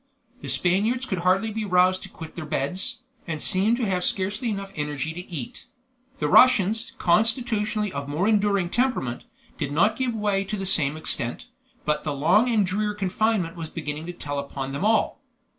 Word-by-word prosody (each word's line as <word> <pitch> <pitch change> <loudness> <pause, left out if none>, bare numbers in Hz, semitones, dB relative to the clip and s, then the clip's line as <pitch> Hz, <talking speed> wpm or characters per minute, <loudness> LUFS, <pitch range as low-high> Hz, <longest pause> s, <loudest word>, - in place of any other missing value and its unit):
The - - -7
Spaniards 215 +9 +1
could 190 -7 -2
hardly 190 +5 +2
be 220 +1 -3
roused 185 -1 +3
to - - -9
quit 160 -1 -10
their 170 - -5
beds, 185 - -2 0.2
and 160 -2 -3
seemed 210 +7 +3
to 245 - -1
have 185 -3 0
scarcely 205 +7 -1
energy 195 -2 -4 0.4
enough 180 +3 -8
to - - -18
eat. 140 -8 -7 0.5
The - - -1
Russians, 225 -2 +4
constitutionally 215 +1 +1
of 140 0 -4
more 165 +7 0
enduring 200 -4 +2
temperament, 240 - -1 0.3
did 140 - -2
not 175 +9 +3
give 250 -1 -1
way 205 -2 0
to 210 +2 -4
the 195 - -4
same 155 -6 +2
extent, 120 -6 -2 0.4
but 150 0 0
the 150 -2 -2
long 180 - +3
and 215 -4 +3
drear 210 +3 -1
confinement 195 -2 0
was 165 -2 -6
beginning 155 0 -5
to 175 - -5
tell 145 -4 -4
upon 140 -1 -5
them 140 +6 -4
all. 220 +1 +2
190 Hz, 180 wpm, -25 LUFS, 165-215 Hz, 0.5 s, Russians